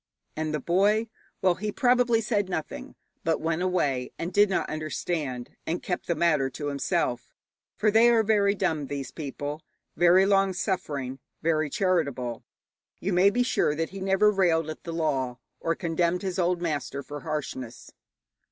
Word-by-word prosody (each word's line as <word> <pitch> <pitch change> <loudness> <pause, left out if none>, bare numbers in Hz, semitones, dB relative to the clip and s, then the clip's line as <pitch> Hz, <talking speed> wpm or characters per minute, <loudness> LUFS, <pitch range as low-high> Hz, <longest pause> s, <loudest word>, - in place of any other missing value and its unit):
And 155 0 -2
the 155 - -1
boy? 205 +8 +2 0.3
Well, 185 -2 +5
he 210 +4 -4
probably 245 -1 +3
said 205 -3 0
nothing, 160 -5 -5 0.3
but 165 0 +1
went 165 +1 -1
away 145 -9 0
and 175 +2 -4
did 205 +1 +5
not 190 - 0
understand, 155 -4 -3
and 170 +2 -2
kept 180 - -3
the 170 - +1
matter 155 -5 +2
to 145 +2 -4
himself, 130 -3 -1 0.5
for 215 0 +3
they 225 +3 +6
are 230 -2 +4
very 205 -2 +3
dumb, 155 -6 -1
these 140 -2 -5
people, 145 0 -5 0.3
very 175 +2 +5
long 195 -1 +3
suffering, 145 -9 -3 0.2
very 155 -2 +1
charitable. 140 - -1 0.6
You 195 +1 -1
may 185 +3 +6
be 245 +5 +1
sure 150 -11 +1
that 165 +1 -2
he 195 - -7
never 195 +2 +3
railed 165 -5 +2
at - - -11
the 170 - -4
law, 135 -7 -1 0.2
or 165 0 0
condemned 170 +1 0
his 190 -1 -2
old 175 0 +1
master 145 -3 -2
for 145 +2 -7
harshness. 130 -6 -5
170 Hz, 165 wpm, -27 LUFS, 150-195 Hz, 0.6 s, they